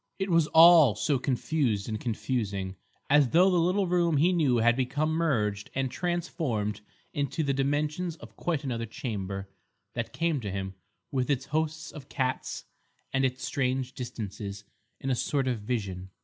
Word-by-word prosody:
It 195 -1 -2
was 165 -2 +4
all 160 -8 +8
so 135 +5 +1
confused 125 -5 0
and 110 -2 -3
confusing, 105 -5 -2 0.3
as 145 -2 +5
though 180 +6 +5
the 180 - +3
little 185 +4 +2
room 170 -3 +2
he 170 +6 +4
knew 145 -8 +3
had 120 +1 +4
become 145 +5 0
merged 115 -11 0
and 135 -1 0
transformed 155 - -2 0.3
into 145 +2 -1
the 140 -2 +1
dimensions 150 +5 0
of 115 -8 -13
quite 165 -5 -2
another 115 -4 -3
chamber, 100 -4 -4 0.5
that 115 -1 -3
came 165 -3 0
to 105 - -4
him, 95 0 -4 0.4
with 130 -1 0
its 135 -2 +1
host 155 +1 -2
of 145 -2 -10
cats 130 -1 -2 0.5
and 130 - +2
its 130 0 -1
strange 130 -1 -1
distances, 105 -4 -6 0.4
in 135 - -2
a - - +2
sort 135 +2 0
of 125 -3 0
vision. 100 -5 -3
130 Hz, 165 wpm, -28 LUFS, 110-160 Hz, 0.5 s, all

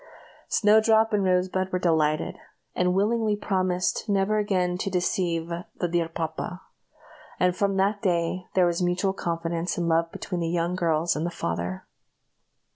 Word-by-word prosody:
Snowdrop 220 +1 +4
and 205 -1 +2
Rosebud 185 0 +1
were 185 - +1
delighted, 155 -4 +1 0.4
and 180 0 +1
willingly 215 +2 +2
promised 185 0 -1
never 200 +2 +2
again 185 -4 0
to 195 - -1
deceive 175 -2 -1 0.2
"the 175 - -1
dear 170 -1 0
papa;" 165 +2 -4 0.8
and 180 -1 +2
from 200 0 0
that 200 +2 +1
day 180 0 0
there 185 -1 +5
was 175 0 0
mutual 180 +2 +1
confidence 170 -1 -2
and 170 -1 -1
love 165 0 +2
between 180 -3 -4
the 165 - -1
young 170 +1 0
girls 165 -1 +1
and 150 - -2
the 170 - -1
father. 90 - -4
180 Hz, 150 wpm, -26 LUFS, 170-195 Hz, 0.8 s, there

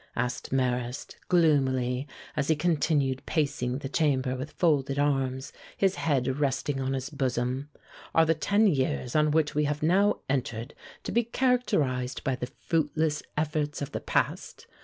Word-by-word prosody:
asked 125 0 -2
Marrast, 125 -1 -1
gloomily, 135 -6 +2 0.3
as 145 -2 0
he 160 - +3
continued 150 -4 +1
pacing 140 -5 0
the 140 - -5
chamber 135 -3 +1
with 130 +4 -5
folded 140 -5 +1
arms, 135 -1 0 0.2
his 195 -1 +3
head 135 -5 0
resting 135 0 0
on 135 0 -1
his 135 0 -3
bosom. 130 0 -1 0.5
"Are 165 - +6
the 165 - +3
ten 200 +7 +2
years 130 - 0
on 155 0 +4
which 150 0 +2
we 150 0 +1
have 150 +1 -2
now 195 +6 +3
entered 125 -2 -2 0.3
to - - -4
be 235 - +3
characterized 190 - 0
by 135 -3 0
the 125 -1 -4 0.2
fruitless 155 -1 +1 0.2
efforts 150 -1 -1
of 145 0 -4
the - - -3
past? - - -1
145 Hz, 155 wpm, -28 LUFS, 130-155 Hz, 0.5 s, Are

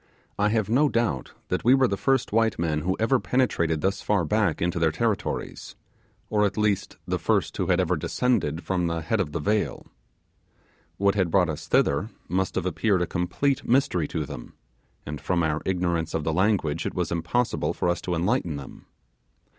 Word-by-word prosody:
I 105 +1 +3
have 110 -2 +1
no 135 +7 +3
doubt 115 - -1 0.2
that 90 - -1
we 125 +3 +6
were 135 -1 +4
the 100 - -1
first 135 +4 +1
white 110 -1 +2
men 80 -3 0
who 95 +4 -1
ever 125 +4 +3
penetrated 85 - +1
thus 95 +1 0
far 100 -5 +1
back 105 -1 +1
into 85 0 0
their 80 -1 +3
territories, 110 +4 -2 0.5
or 105 -1 +1
at 100 0 0
least 105 -2 0
the - - -1
first - - 0
who - - -1
had 90 - +3
ever 90 -1 +2
descended 85 - 0
from 90 -2 0
the 85 0 -2
head 110 +7 0
of 90 -6 -1
the - - -3
vale. 105 +7 -1 1.1
What 100 0 +3
had 95 -4 +1
brought 90 -1 +3
us 75 - -5
thither 80 +10 +2 0.2
must 95 +1 -1
have 95 - -1
appeared 95 +1 +1
a - - 0
complete 90 +11 -1
mystery 120 - +2
to - - -3
them, - - -9 0.5
and 75 0 -6
from 90 -2 0
our 75 0 0
ignorance 85 -3 0
of 80 - -1
the 80 - -1
language 90 -4 +1
it - - -5
was 90 -3 -1
impossible 115 +9 0
for - - -2
us 85 0 0
to 90 - -2
enlighten 90 - 0
them. 70 -2 -10
95 Hz, 195 wpm, -25 LUFS, 85-110 Hz, 1.1 s, we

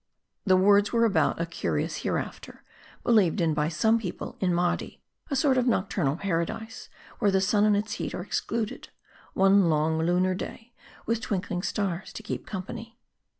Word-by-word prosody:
The 185 -1 +6
words 200 +2 +4
were 230 -1 +3
about 210 -5 +2
a 170 - 0
curious 165 - -2
hereafter, - - -4 0.4
believed 210 -5 +3
in 165 -2 +2
by 150 +1 0
some 220 +8 +2
people 190 -6 -6
in 185 -2 +1
Mardi: 175 0 -1 0.3
a 280 - -1
sort 265 -1 +3
of 250 - 0
nocturnal 185 - +1
Paradise, 195 +6 -3 0.3
where 205 - +3
the 190 -1 +3
sun 205 +2 +3
and 210 -1 +4
its 215 +1 -3
heat - - -4
are 180 - -4
excluded: 220 +2 -3 0.5
one 195 -2 +5
long, 160 +1 +1
lunar 180 +3 +2
day, 225 +5 -7 0.3
with 230 0 0
twinkling 180 -4 -2
stars 195 -2 -2
to 220 - -8
keep 215 - -5
company. 230 +4 -7
195 Hz, 165 wpm, -27 LUFS, 175-220 Hz, 0.5 s, The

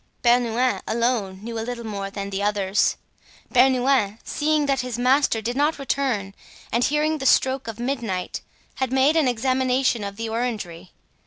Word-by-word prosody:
Bernouin 240 +1 +2
alone 220 -5 -1
knew 230 0 -4
a - - -2
little 235 0 -5
more 200 -2 -4
than 200 0 -6
the 195 +1 -2
others. 200 -1 +1 0.6
Bernouin, 255 -4 +3
seeing 300 0 0
that 275 -2 +1
his 250 -1 -3
master 250 -2 +2
did 240 +3 -2
not 295 +3 +1
return 260 -8 -1 0.4
and 235 +2 +1
hearing 300 +2 +1
the 270 - 0
stroke 265 -1 +3
of 225 0 -6
midnight, 235 -8 -3 0.4
had 260 -2 -1
made 265 +4 +3
an 315 -5 +3
examination 255 -1 +1
of 200 0 -5
the 225 +2 -4
orangery. 215 -7 -4
240 Hz, 160 wpm, -23 LUFS, 210-265 Hz, 0.6 s, Bernouin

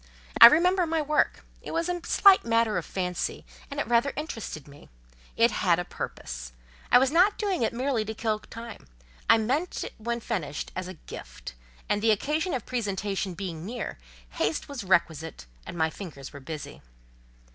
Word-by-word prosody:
I - - +14
remember 355 +6 +4
my 325 0 0
work; 300 0 +1 0.2
it - - -8
was 330 +1 -1
a 350 -1 -3
slight 395 -2 +6
matter 230 -2 +2
of - - -9
fancy, 180 -2 -3 0.2
and 280 - -5
it - - 0
rather 240 +4 +2
interested 225 - -6
me; 145 0 -15 0.5
it - - +5
had - - +2
a - - -2
purpose; - - -6 0.4
I - - +9
was 260 +2 +3
not 365 +6 +4
doing 395 - -1
it 225 - +2
merely 250 -1 0
to 220 +1 -5
kill 215 -1 -1
time; 230 - -10 0.4
I - - +8
meant 270 +11 -1
it - - -7
when 235 +2 -2
finished 175 -11 -4
as 185 0 -4
a 185 - -8
gift; - - -10 0.3
and 205 - 0
the 225 - +3
occasion 300 - +1
of 245 - -4
presentation 200 -5 -2
being 170 -3 -5
near, 230 - -5 0.3
haste 150 - -1
was 280 -6 -6
requisite, 165 - 0 0.2
and - - -7
my 160 -1 +1
fingers 155 -8 -9
were 140 - -8
busy. 150 +2 -8
225 Hz, 180 wpm, -27 LUFS, 175-280 Hz, 0.5 s, I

